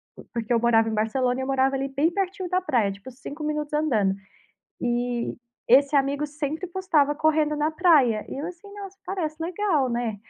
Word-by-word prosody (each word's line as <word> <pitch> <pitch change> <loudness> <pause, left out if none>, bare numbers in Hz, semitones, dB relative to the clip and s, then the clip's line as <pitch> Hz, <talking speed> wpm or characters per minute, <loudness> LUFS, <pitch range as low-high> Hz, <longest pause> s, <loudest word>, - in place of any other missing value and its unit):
po - - -13
porque 235 0 -1
eu 230 - +3
morava 225 -1 +3
em - - -3
Barcelona 245 +4 0
e - - -2
eu - - -4
morava 270 0 +2
ali, 270 0 -2
bem 285 +4 +2
pertinho 380 -1 -2
da 365 0 +1
praia, 240 - +1
tipo 200 +7 -10
5 285 +4 -8
minutos 300 -1 -3
andando. 225 -11 +2 0.7
E 240 0 -1 0.3
esse 280 +4 +5
amigo 280 +1 +1
sempre 300 +4 -4
postava 330 -6 +1
correndo 305 0 +2
na 300 +1 +1
praia. 295 - +4
E - - -6
eu 300 - -4
assim: 360 +3 -10
"Nossa, 395 -1 -9
parece 325 -6 -3
legal", 335 -7 0
né. 235 -3 -2
285 Hz, 190 wpm, -25 LUFS, 245-320 Hz, 0.7 s, esse